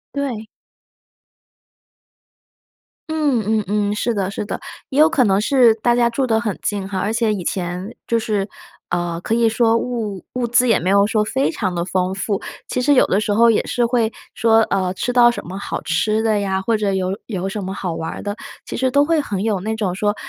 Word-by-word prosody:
对。 245 -6 -3 2.6
嗯 295 -7 +1
嗯 220 0 +1
嗯， 205 0 0
是 235 +2 0
的， 195 -2 -2
是 205 - -4
的， - - -4 0.3
也 270 - -4
有 315 +1 +7
可 280 -6 +3
能 195 -1 +3
是 240 -1 +4
大 240 +2 +1
家 240 -1 +3
住 260 +3 -1
得 225 -3 +2
很 215 -4 -3
近 200 -2 -2
哈， 190 -1 -3
而 205 +3 -1
且 225 -2 +1
以 185 -4 -4
前 180 +4 -3
就 230 - +2
是， 210 -3 -1 0.4
呃， 175 -1 -1
可 215 - -2
以 230 -1 +3
说 225 0 +2
物 225 -6 -3
物 250 -1 0
资 245 +1 +3
也 225 - +4
没 180 - -1
有 200 0 +5
说 215 0 +1
非 265 +6 0
常 195 - -2
地 170 - -1
丰 185 +1 -1
富， 200 0 -2 0.3
其 250 - -1
实 290 +3 +4
有 255 - +5
的 195 - +2
时 210 -1 0
候 230 +2 +5
也 220 - +1
是 240 - +1
会 235 -2 +1 0.2
说， 225 0 +4
呃， 185 -1 0
吃 245 - -2
到 245 -1 +6
什 240 - -4
么 190 +3 -6
好 - - -4
吃 215 +7 0
的 215 -2 +2
呀， 190 -1 -1
或 225 +2 +1
者 200 -2 0
有 190 +1 -1
有 195 -3 -3
什 210 0 -4
么 190 +1 -4
好 180 -4 -3
玩 165 0 -4
儿 - - -7
的， 205 +1 -4 0.3
其 - - -5
实 260 +1 +1
都 285 +3 +4
会 320 +1 +2
很 205 -9 -2
有 210 -4 0
那 220 +4 -3
种 205 -5 -1
说 205 +2 0
215 Hz, 235 characters per minute, -20 LUFS, 195-235 Hz, 2.6 s, 有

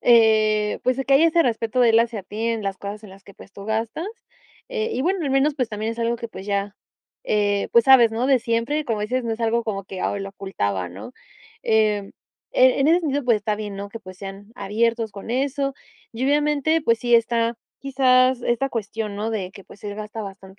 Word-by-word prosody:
eh, 215 -2 +4
pues, 255 +1 +1
que 275 - +4
haya 305 +5 +6
ese 335 +1 +3
respeto 235 0 0
de 240 -2 +6
él 225 +1 +5
hacia 230 -3 -2
ti 215 +4 -4
en 230 -2 -1
las 195 -1 -3
cosas 205 +2 -7
en 205 - -11
las 195 +1 -15
que, 200 - -15
pues, 195 - -15
tú 200 - -10
gastas, 225 - -2 0.6
eh, 455 -2 -2
y, 255 - -1
bueno, 370 +4 0
al 280 - -1
menos, 270 +2 +2
pues, 250 -5 -1
también 215 +1 -3
es 230 - -11
algo 235 0 0
que, 235 0 -6
pues, 195 -3 -10
ya, 200 0 -1 0.5
eh, 205 - +1
pues 235 -1 +6
sabes, 245 -4 +7
¿no?, 235 +3 0
de 270 -2 +4
siempre, 235 +6 -1
como 225 -5 -2
dices, 250 +4 -1
no 230 - -1
es 225 - -6
algo 230 +1 +1
como 200 -3 -3
que, 190 -1 -7
ah, 200 - -1
lo 195 0 -5
ocultaba, 100 - -3
¿no? 95 - -10 0.5
Em, 215 -2 +1 0.4
en 255 0 +6
en 275 - +3
ese 340 +2 +5
sentido, 290 -4 -1
pues 235 -2 +4
está 210 0 -2
bien, 205 -2 -6
¿no?, 200 +1 -6
que, 230 - -8
pues, 185 -2 -12
sean 195 +2 -9
abiertos 225 +1 0
con 200 +3 -8
eso 275 +2 -1 0.4
y, 235 +3 -3
obviamente, 295 +2 +2
pues 230 -5 +2
sí 240 0 +2
está 230 0 +2 0.2
quizás 255 -2 +3
esta 240 +3 0
cuestión, 220 -3 -4
¿no?, 215 +2 -2
de 195 -5 -3
que, 195 -2 -13
pues, 200 - -16
él 205 -1 -4
gasta 215 +1 -6
bastante 195 -1 -10
225 Hz, 225 wpm, -23 LUFS, 205-255 Hz, 0.6 s, sabes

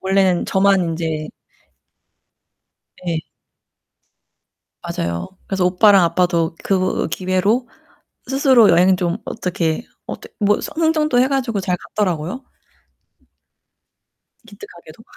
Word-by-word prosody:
원래는 190 -2 +1
저만 195 0 +3
인제 160 -2 -3 1.8
네. 165 -2 -1 1.6
맞아요. 85 0 -4 0.2
그래서 190 -2 0
오빠랑 190 +1 +5
아빠도 170 -1 +1
그 185 -1 0
기회로 190 +8 0 0.6
스스로 265 -5 +5
여행 180 +2 +4
좀 180 0 -1
어떻게 170 -1 -2 0.2
어떻 - - -8
뭐 205 -1 +2
스 - - -5
흥정도 310 -5 +2
해 260 - +3
가지고 250 -7 -1
잘 180 -1 -1 0.2
갔더라고요. 185 - -1 2.1
기특하게도. 170 -3 -14
185 Hz, 220 characters per minute, -19 LUFS, 170-215 Hz, 2.1 s, 오빠랑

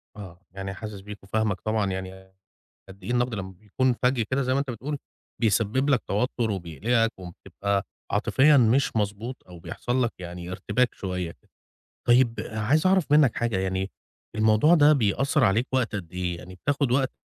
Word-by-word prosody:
آه، 95 -4 -10
يعني 95 0 -6
حاسِس 105 -1 -8
بيك 105 0 -10
وفاهمك 110 0 -1
طبعًا 110 -3 0
يعني 95 0 -7 0.6
قدّ 95 -1 -14
إيه 110 - -5
النَقد 120 -1 +1
لمّا 95 -2 -5
بيكون 110 +7 0
فَجّ 125 -1 +2
كده 135 +1 +1
زي 130 - 0
ما 135 - +2
أنت 140 -2 -2
بتقول، 140 +5 -4 0.4
بيسبِّب 115 +5 +1
لك 130 - +3
توتُّر 115 +2 0
وبيقلِقك 105 - 0
وبتبقى 100 +2 -3 0.3
عاطفيًا 145 +2 +4
مش 125 +1 +3
مضبوط 105 +4 -2
أو 90 - -11
بيحصل 120 +9 -2
لك 120 - 0
يعني 90 0 -7
ارتباك 105 +6 0
شوية. 90 -3 -4 0.7
طيب 120 -1 +5 0.2
عايز 120 +10 +1
أعرف 185 -4 +3
منّك 150 -6 +5
حاجة، 115 -4 0
يعني 95 +1 -2 0.4
الموضوع 110 +9 +4
ده 150 -2 +6
بيأثّر 135 +4 +2
عليك 110 +5 +2
وقت 125 -4 0
قد 90 -4 -5
إيه؟ 90 -1 -3
يعني 90 +2 -11
بتاخُد 140 +4 0
وقت 130 0 +1
110 Hz, 165 wpm, -26 LUFS, 95-130 Hz, 0.7 s, ده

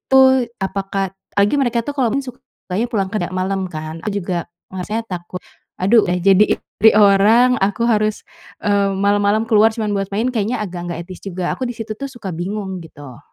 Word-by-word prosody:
tu 265 0 +7 0.4
apakah 195 0 -2 0.3
lagi 200 +6 +4
mereka 240 -3 +1
tuh - - -2
kalau 250 -4 +2
main 275 - 0
sukanya 235 -4 -5
pulang 195 -5 0
kerja 180 -4 -2
malam 190 +1 -1
kan, 155 0 -6
aku 215 - -1
juga, 175 -1 -3 0.3
maksudnya 210 +5 -3
takut, 180 0 -6 0.4
"Aduh 215 +4 +4
udah 180 0 0
jadi 195 +2 +4
istri 220 +2 +3
orang 215 +5 +5
aku 205 +4 0
harus, 215 -2 +1 0.4
eee, 200 -1 +2
malam-malam 205 +2 +2
keluar 220 -1 +5
cuman 215 -3 -2
buat 195 -1 -2
main, 225 +5 +1
kayaknya 225 0 -1
agak 175 -2 -6
nggak 170 - -4
etis 185 -2 -10
juga," 180 -2 -3
aku - - -9
di 245 - -5
situ 220 -1 -5
tuh 275 - -4
suka 235 -7 -7
bingung 190 +2 -4
gitu. 145 -5 -12
200 Hz, 185 wpm, -19 LUFS, 185-220 Hz, 0.4 s, tu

